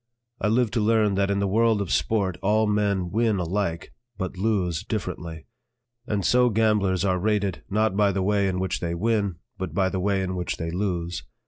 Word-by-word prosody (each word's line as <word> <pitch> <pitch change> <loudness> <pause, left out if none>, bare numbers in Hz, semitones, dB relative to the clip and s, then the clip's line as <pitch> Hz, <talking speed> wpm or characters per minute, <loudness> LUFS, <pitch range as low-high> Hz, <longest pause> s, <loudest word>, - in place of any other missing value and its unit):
I - - +1
lived 115 +1 +2
to 120 - +1
learn 110 -1 +3
that 100 0 +1
in 100 - +1
the 100 0 +1
world 110 +2 +3
of 100 -4 -3
sport 100 -5 0
all 110 +2 +2
men 100 -4 0
win 110 0 +2
alike, 90 -1 -2 0.2
but 95 -2 -4
lose 95 -4 0
differently; 85 -6 -5 0.6
and 105 -4 -1
so 125 0 +4
gamblers 105 -4 +2
are 90 -1 +1
rated, 100 -1 0
not 105 0 +1
by 100 -1 +3
the 95 0 -1
way 100 0 +2
in 90 -1 -1
which 95 0 -1
they 85 -1 -2
win, 100 -1 0 0.2
but 90 -4 -4
by 95 -1 +2
the 95 - -2
way 95 0 +1
in 95 0 -3
which 90 -1 -3
they 80 0 -3
lose. 90 -2 -2
100 Hz, 200 wpm, -25 LUFS, 90-105 Hz, 0.6 s, so